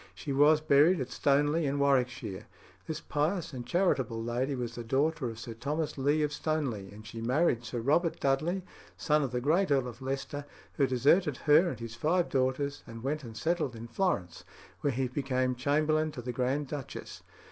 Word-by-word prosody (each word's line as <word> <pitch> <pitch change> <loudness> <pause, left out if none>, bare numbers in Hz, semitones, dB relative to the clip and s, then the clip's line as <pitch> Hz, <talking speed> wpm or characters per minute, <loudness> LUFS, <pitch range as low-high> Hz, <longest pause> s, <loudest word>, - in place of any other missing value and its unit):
She 140 - -4
was 150 +3 +5
buried 155 +4 +5
at 130 - -4
Stoneleigh 145 +3 +2
in 140 +1 -1
Warwickshire. 125 -7 0 0.4
This 155 -1 -3
pious 155 +2 -1
and 120 -2 -6
charitable 130 - +1
lady 125 +4 -1
was 120 -2 -4
the 120 - -6
daughter 135 +3 0
of 115 - -8
Sir 115 0 -7
Thomas 145 +7 -2
Leigh 145 +3 +2
of 150 0 -1
Stoneleigh, 130 - -2
and 105 +1 -12
she 115 +1 -7
married 125 0 +2
Sir 120 0 -4
Robert 160 +7 +2
Dudley, 155 +8 0 0.3
son 150 -1 +2
of 140 - -1
the 125 - -1
great 160 +9 +2
Earl 135 -3 +2
of 120 +1 -9
Leicester, 135 +2 -4 0.3
who 140 - +2
deserted 140 +4 +3
her 155 +4 +6
and 125 - -6
his 115 -1 -6
five 165 +9 +1
daughters, 135 +2 0
and 115 0 -9
went 150 +3 -2
and 115 -3 -9
settled 155 -1 -1
in 115 +1 -8
Florence, 115 - -1 0.4
where 145 - 0
he 130 +1 -1
became 130 -1 0
chamberlain 155 +4 +1
to 125 - -7
the 125 0 -4
Grand 130 +4 0
Duchess. 140 -2 -7
140 Hz, 190 wpm, -30 LUFS, 125-155 Hz, 0.4 s, her